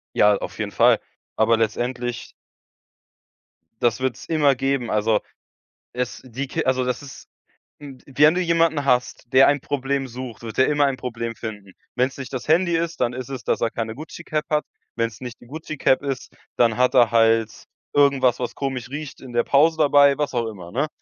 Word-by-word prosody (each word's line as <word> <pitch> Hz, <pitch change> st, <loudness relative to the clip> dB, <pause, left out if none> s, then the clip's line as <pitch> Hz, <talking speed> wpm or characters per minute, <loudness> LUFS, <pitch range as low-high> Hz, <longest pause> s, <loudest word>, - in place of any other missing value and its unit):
Ja, 105 Hz, 0 st, +5 dB
auf -, -, -7 dB
jeden -, -, -3 dB
Fall, -, -, +4 dB, 0.4 s
aber 115 Hz, +1 st, +3 dB
letztendlich 120 Hz, +2 st, -2 dB, 1.5 s
Das 120 Hz, 0 st, +1 dB
wird 130 Hz, -2 st, -1 dB
es -, -, -12 dB
immer 150 Hz, -4 st, +3 dB
geben. 135 Hz, -2 st, -1 dB
Also 105 Hz, 0 st, +2 dB, 0.7 s
es 125 Hz, 0 st, -4 dB
die 130 Hz, +3 st, -5 dB
Ki -, -, -3 dB
also 130 Hz, -1 st, +1 dB
das 125 Hz, +1 st, -2 dB
ist, 140 Hz, -1 st, -12 dB, 0.5 s
hm 140 Hz, -3 st, -10 dB
wenn 150 Hz, +3 st, +4 dB
du 185 Hz, -, +1 dB
jemanden 165 Hz, -4 st, +2 dB
hast, 125 Hz, -3 st, 0 dB
der 130 Hz, +1 st, +7 dB
ein 145 Hz, 0 st, +3 dB
Problem 135 Hz, -1 st, -2 dB
sucht, 120 Hz, -2 st, -8 dB
wird 115 Hz, -1 st, -7 dB
der 130 Hz, -, +4 dB
immer 145 Hz, -1 st, +3 dB
ein 135 Hz, -1 st, 0 dB
Problem 115 Hz, -2 st, -5 dB
finden. 105 Hz, -4 st, -8 dB, 0.2 s
Wenn 125 Hz, +1 st, +2 dB
es -, -, -15 dB
nicht 135 Hz, -2 st, -7 dB
das 130 Hz, -, -5 dB
Handy 170 Hz, +2 st, +3 dB
ist, 165 Hz, 0 st, -3 dB
dann 120 Hz, -, +1 dB
ist 130 Hz, 0 st, -6 dB
es, 135 Hz, -3 st, -6 dB
dass -, -, -1 dB
er 115 Hz, -, +1 dB
keine 110 Hz, -1 st, -4 dB
Gucci-Cap 155 Hz, 0 st, -5 dB
hat. 150 Hz, -1 st, +1 dB, 0.3 s
Wenn 115 Hz, 0 st, +1 dB
es 115 Hz, -, -14 dB
nicht 125 Hz, -2 st, -8 dB
die -, -, -15 dB
Gucci-Cap 150 Hz, -1 st, 0 dB
ist, 135 Hz, -2 st, -4 dB, 0.2 s
dann 115 Hz, -2 st, +3 dB
hat 125 Hz, 0 st, +3 dB
er 120 Hz, -3 st, +5 dB
halt 115 Hz, -1 st, +2 dB, 0.3 s
irgendwas, 135 Hz, -4 st, +3 dB
was 125 Hz, -, -4 dB
komisch 130 Hz, -3 st, -4 dB
riecht 145 Hz, 0 st, -7 dB
in 130 Hz, -2 st, -10 dB
der 120 Hz, 0 st, +2 dB
Pause 155 Hz, +3 st, +3 dB
dabei, 145 Hz, -2 st, +5 dB
was 150 Hz, -2 st, -2 dB
auch 120 Hz, -2 st, -1 dB
immer, 90 Hz, -6 st, -9 dB
ne? 140 Hz, +7 st, 0 dB
130 Hz, 195 wpm, -22 LUFS, 115-145 Hz, 1.5 s, der